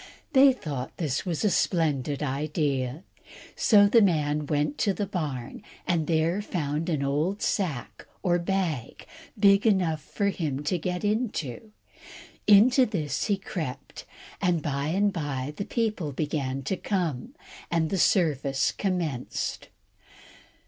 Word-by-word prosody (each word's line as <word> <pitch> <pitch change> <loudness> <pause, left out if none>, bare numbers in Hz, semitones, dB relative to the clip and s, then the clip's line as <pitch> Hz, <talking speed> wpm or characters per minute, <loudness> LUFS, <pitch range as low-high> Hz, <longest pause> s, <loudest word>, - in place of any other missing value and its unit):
They 270 0 +7
thought 145 - -6
this 150 -1 -2
was 170 +4 -1
a 205 - +3
splendid 150 -6 0
idea. 140 0 -1 0.5
So 205 -3 +5
the 225 +3 +5
man 150 -6 +1
went 145 0 -1
to 200 -3 +1
the 205 - -1
barn, 150 - -4 0.2
and 165 -4 0
there 165 +4 +1
found 160 -4 -2
an 150 -4 0
old 155 +9 -1
sack 125 - -2 0.2
or 175 -1 +2
bag, 170 - -2 0.3
big 200 +1 +5
enough 175 -7 +2
for 200 +5 -1
him 150 -7 -3
to 175 +4 0
get 180 +3 -3
into. 210 - -2 0.8
Into 245 +5 +6
this 165 -9 -2
he 205 -2 +1
crept, 165 -8 -6 0.4
and 175 -4 +1
by 140 0 -1
and 200 +5 +1
by 145 -4 -3
the 200 - -4
people 215 - -1
began 135 -2 -2
to 185 +8 -2
come, 180 - -2 0.3
and 165 -2 0
the 195 - 0
service 140 -8 +2
commenced. 170 -10 -3
165 Hz, 135 wpm, -27 LUFS, 145-195 Hz, 0.8 s, They